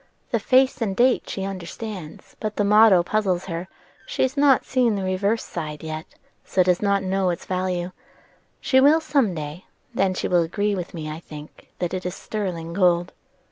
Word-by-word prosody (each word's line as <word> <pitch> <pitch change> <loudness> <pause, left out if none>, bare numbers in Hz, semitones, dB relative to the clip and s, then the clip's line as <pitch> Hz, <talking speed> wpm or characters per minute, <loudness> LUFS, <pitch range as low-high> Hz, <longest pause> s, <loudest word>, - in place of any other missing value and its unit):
The - - +1
face 260 -1 +3
and 200 -4 -1
date 250 +3 +2
she 195 - -4
understands; 190 -2 -7
but 215 -1 -3
the 205 - +1
motto 205 -3 +6
puzzles 190 -2 0
her, 170 -3 -4
and 180 - -8 0.4
she - - -1
has 260 +2 0
not 280 -2 +4
seen 245 -4 +2
the 195 - -3
reverse 200 +4 0
side 155 -3 -6
yet, 155 +1 -5 0.4
so 185 - +2
does 180 -1 +2
not 200 -1 +1
know 190 0 0
its 175 - -3
value. 180 -1 -2 0.7
She 260 0 +3
will 295 +4 +6
some 275 - +1
day; 150 +3 -6 0.3
and - - -9
then 195 -1 +3
she - - -2
will 175 -1 +3
agree 205 +5 -1
with 180 -2 -5
me, 155 -2 -5
I 155 +1 -5
think, 150 -2 -12
that 175 0 -3
it 185 0 -3
is 180 +1 -4
sterling 175 -6 -4
gold." 175 -1 +2
185 Hz, 195 wpm, -23 LUFS, 175-215 Hz, 0.7 s, motto